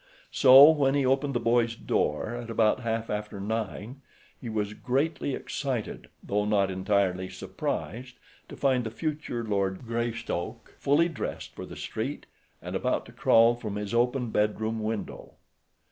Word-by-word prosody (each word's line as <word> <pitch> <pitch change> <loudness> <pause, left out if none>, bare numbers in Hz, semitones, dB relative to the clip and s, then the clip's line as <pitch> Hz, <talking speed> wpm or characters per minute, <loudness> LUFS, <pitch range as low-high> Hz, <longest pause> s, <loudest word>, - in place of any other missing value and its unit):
So, 135 +3 +9
when 140 -3 +2
he 140 -2 +2
opened 135 +1 +1
the - - +2
boy's 115 0 +2
door 75 +1 -1
at 120 -1 -6
about 115 +1 +2
half 115 -2 -2
after 105 -1 -4
nine, 110 +4 -4 0.3
he 120 - -8
was 105 -1 -2
greatly 140 +4 -1
excited, 130 -6 -4
though 105 +1 0
not 100 -2 +2
entirely 95 -1 0
surprised 115 +11 -5 0.3
to - - -9
find 130 -3 +2
the 110 - -3
future 150 -2 -4
Lord 100 0 -1
Greystoke 115 -5 -4
fully 145 +5 +3
dressed 165 - -5
for - - -8
the - - -9
street - - -4 0.4
and - - -5
about - - 0
to - - -13
crawl 115 +1 +5
from 110 -4 -6
his 105 0 -4
open 125 0 +1
bed 105 0 +1
room 110 0 -2
window. 110 0 -5
115 Hz, 155 wpm, -27 LUFS, 105-130 Hz, 0.4 s, So